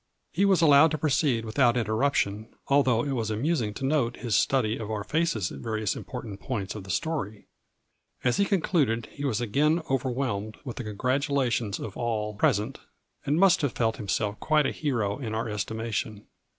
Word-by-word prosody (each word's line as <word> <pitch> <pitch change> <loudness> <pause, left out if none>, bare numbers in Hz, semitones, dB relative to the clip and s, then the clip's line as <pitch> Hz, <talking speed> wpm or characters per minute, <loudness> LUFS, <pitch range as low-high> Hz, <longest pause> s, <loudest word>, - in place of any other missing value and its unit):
He 195 +5 +2
was 190 -4 +4
allowed 145 +1 +7
to 155 - -2
proceed 135 -6 +1
without 120 +2 +2
in 115 - +1
terruption, 110 -3 0 0.2
although 130 -4 +3
it 145 - -2
was 115 -5 -1
amusing 115 0 0
to 135 - -3
note 135 -5 +1
his 120 -5 -1
study 110 +2 +2
of 110 -2 -5
our 105 -2 -2
faces 150 - 0
at - - -8
various 110 -3 -2
important 115 -6 -7
points 105 -6 -4
of 105 -3 -8
the - - -12
story. 110 - -2 0.8
As 125 -1 +2
he 200 - +3
concluded 150 - +1
he 145 - -6
was 120 -5 0
again 150 +9 +2
overwhelmed 120 -5 -1
with 125 - -6
the 125 - -4
congratulations 125 -1 0
of 105 - -6
all 110 -3 -2
present, 115 +1 0 0.5
and 150 +4 +2
must 195 -2 +5
have 145 -4 0
felt 115 -2 0
himself 105 0 -2
quite 155 -2 +2
a - - +1
hero 115 -7 -1
in 110 -5 -4
our 115 +1 -2
estimation. 110 0 -3
120 Hz, 180 wpm, -27 LUFS, 110-140 Hz, 0.8 s, allowed